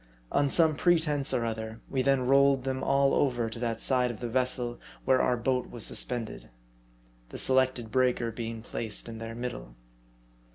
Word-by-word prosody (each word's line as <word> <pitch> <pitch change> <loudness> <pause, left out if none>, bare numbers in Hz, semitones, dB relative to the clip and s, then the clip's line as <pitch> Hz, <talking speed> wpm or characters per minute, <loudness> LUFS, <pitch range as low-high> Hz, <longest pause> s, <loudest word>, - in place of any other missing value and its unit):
On 140 0 +2
some 160 0 +4
pretense 150 -4 +2
or 125 -3 0
other, 110 0 -4
we 130 - -1
then 135 -1 +2
rolled 135 0 +4
them 130 0 -2
all 140 0 +3
over 120 -5 +1
to 115 - -7
that 115 -2 -2
side 125 -1 +2
of 120 - -6
the 120 - -3
vessel 125 0 -1 0.3
where 130 -1 +4
our 125 - +2
boat 125 +2 -1
was 120 -3 -6
suspended, 120 -3 -3 0.8
the - - -8
selected 130 -3 +2
breaker 125 -2 +1
being 115 0 -5
placed 115 -3 -4
in 115 -1 -7
their 115 0 -6
middle. 120 - -6
125 Hz, 170 wpm, -29 LUFS, 115-135 Hz, 0.8 s, some